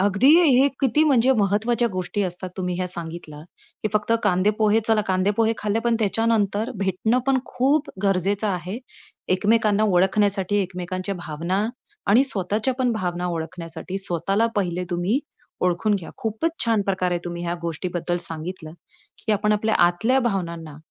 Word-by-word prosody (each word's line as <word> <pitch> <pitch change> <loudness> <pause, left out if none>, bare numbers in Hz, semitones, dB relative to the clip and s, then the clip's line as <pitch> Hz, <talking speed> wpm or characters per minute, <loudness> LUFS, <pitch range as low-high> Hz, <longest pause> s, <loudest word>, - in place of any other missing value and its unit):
अगदी, 200 +6 +3 0.3
हे 275 - +5
किती 270 +3 +3
म्हणजे 265 -3 +4
महत्वाच्या 215 +4 +1
गोष्टी 185 +3 -2
असतात 185 0 -4
तुम्ही 180 -1 -2
ह्या 185 - -1
सांगितल्या, 165 -3 -7 0.4
की 215 - 0
फक्त 215 +2 +1
कांदे 190 0 +3
पोहे 215 0 +3
चला 220 -1 +4
कांदे 185 +1 +2
पोहे 225 0 +3
खाल्ले, 210 +1 0
पण 235 - +3
त्याच्यानंतर 220 +1 +1
भेटणं 195 +5 +1
पण 270 -1 +3
खूप 280 +4 +1
गरजेचं 200 +2 +1
आहे. 185 +4 -3 0.5
एकमेकांना 210 +2 +2
ओळखण्यासाठी 195 +1 +2
एकमेकांच्या 185 +1 -4
भावना 175 +3 -2 0.4
आणि 230 +7 +5
स्वतःच्या 215 +1 -1
पण 250 -2 +2
भावना 180 -4 -2
ओळखण्यासाठी. 165 +2 -5
स्वतःला 195 +4 0
पहिले 180 -2 -1
तुम्ही 175 +8 +1 0.4
ओळखून 180 +4 +1
घ्या. 185 -5 -5
खूपच 225 +6 -1
छान 225 -3 +2
प्रकारे 185 -2 0
तुम्ही 175 0 -5
ह्या 170 0 -1
गोष्टीबद्दल 175 +1 -2
सांगितलं, 165 0 -6 0.5
की 220 - +2
आपण 210 +1 +2
आपल्या 215 +1 +1
आतल्या 225 +10 +1
भावनांना, 170 -6 -5
195 Hz, 145 wpm, -23 LUFS, 180-220 Hz, 0.5 s, हे